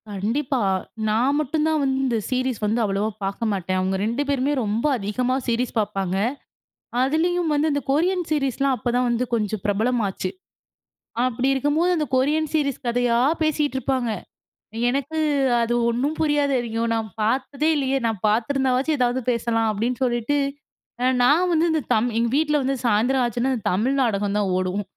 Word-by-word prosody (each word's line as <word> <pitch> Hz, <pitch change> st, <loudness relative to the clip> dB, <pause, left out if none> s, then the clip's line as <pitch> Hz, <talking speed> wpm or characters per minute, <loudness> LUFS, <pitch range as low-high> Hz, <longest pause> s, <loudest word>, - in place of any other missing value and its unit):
கண்டிப்பா. 240 Hz, +7 st, -1 dB, 0.5 s
நான் 240 Hz, +6 st, +2 dB
மட்டும் 305 Hz, +1 st, 0 dB
தான் 315 Hz, -1 st, +1 dB
வந்து 265 Hz, -1 st, +1 dB
இந்த 240 Hz, -3 st, +1 dB
சீரிஸ் 255 Hz, -2 st, -1 dB
வந்து 220 Hz, +3 st, +1 dB
அவ்வளவா 205 Hz, +1 st, 0 dB
பாக்க 195 Hz, +3 st, -3 dB
மாட்டேன். 185 Hz, -1 st, -1 dB
அவுங்க 190 Hz, +1 st, 0 dB
2 235 Hz, +5 st, -1 dB
பேருமே 280 Hz, 0 st, +1 dB
ரொம்ப 215 Hz, +4 st, -1 dB
அதிகமா 245 Hz, +5 st, -1 dB
சீரிஸ் 240 Hz, +1 st, 0 dB
பாப்பாங்க. 195 Hz, -3 st, -1 dB, 0.9 s
அதுலயும் 325 Hz, +5 st, +1 dB
வந்து 295 Hz, +2 st, +2 dB
இந்த 285 Hz, 0 st, 0 dB
கொரியன் 355 Hz, +5 st, +1 dB
சீரிஸ்லாம் 275 Hz, -2 st, +1 dB
அப்ப 245 Hz, -, -2 dB
தான் 250 Hz, 0 st, +2 dB
வந்து 240 Hz, +1 st, 0 dB
கொஞ்சம் 215 Hz, -2 st, -1 dB
பிரபலமாச்சு. 205 Hz, -2 st, 0 dB, 1.0 s
அப்பிடி 255 Hz, +1 st, 0 dB
இருக்கும்போது 290 Hz, +6 st, +1 dB
அந்த 305 Hz, -, 0 dB
கொரியன் 300 Hz, +4 st, +1 dB
சீரிஸ் 280 Hz, -3 st, -1 dB
கதையா 240 Hz, 0 st, +1 dB, 0.2 s
பேசிட்டு 300 Hz, -3 st, 0 dB
இருப்பாங்க. 255 Hz, -2 st, -1 dB, 0.8 s
எனக்கு 280 Hz, +5 st, -2 dB, 0.4 s
அது 235 Hz, +1 st, 0 dB, 0.2 s
ஒன்னும் 270 Hz, +7 st, -1 dB
புரியாது. 295 Hz, -3 st, +2 dB
ஐயோ! 225 Hz, 0 st, -2 dB
நான் 225 Hz, -1 st, -2 dB
பாத்ததே 270 Hz, +6 st, 0 dB
இல்லயே! 270 Hz, -1 st, +1 dB
நான் 220 Hz, -4 st, -2 dB
பார்த்துருந்தாவாச்சு 265 Hz, +5 st, +1 dB
எதாவது 250 Hz, 0 st, +1 dB
பேசலாம், 230 Hz, -1 st, 0 dB
அப்பிடின்னு 235 Hz, +5 st, -2 dB
சொல்லிட்டு 240 Hz, +3 st, 0 dB, 0.7 s
அ -, -, +3 dB, 0.2 s
நான் 325 Hz, +8 st, +4 dB
வந்து 330 Hz, 0 st, +3 dB
இந்த 320 Hz, -1 st, +1 dB
தம் 225 Hz, +3 st, +2 dB
எங்க 235 Hz, 0 st, +2 dB
வீட்ல 300 Hz, 0 st, +2 dB
வந்து 270 Hz, +1 st, 0 dB
சாயந்திரம் 240 Hz, +4 st, +2 dB
ஆச்சுன்னா, 240 Hz, +2 st, -1 dB
இந்த 225 Hz, -, -6 dB
தமிழ் 225 Hz, +9 st, +1 dB
நாடகம் 205 Hz, -4 st, 0 dB
தான் 205 Hz, -2 st, 0 dB
ஓடும். 185 Hz, +2 st, -1 dB
250 Hz, 155 wpm, -23 LUFS, 225-285 Hz, 1.0 s, நான்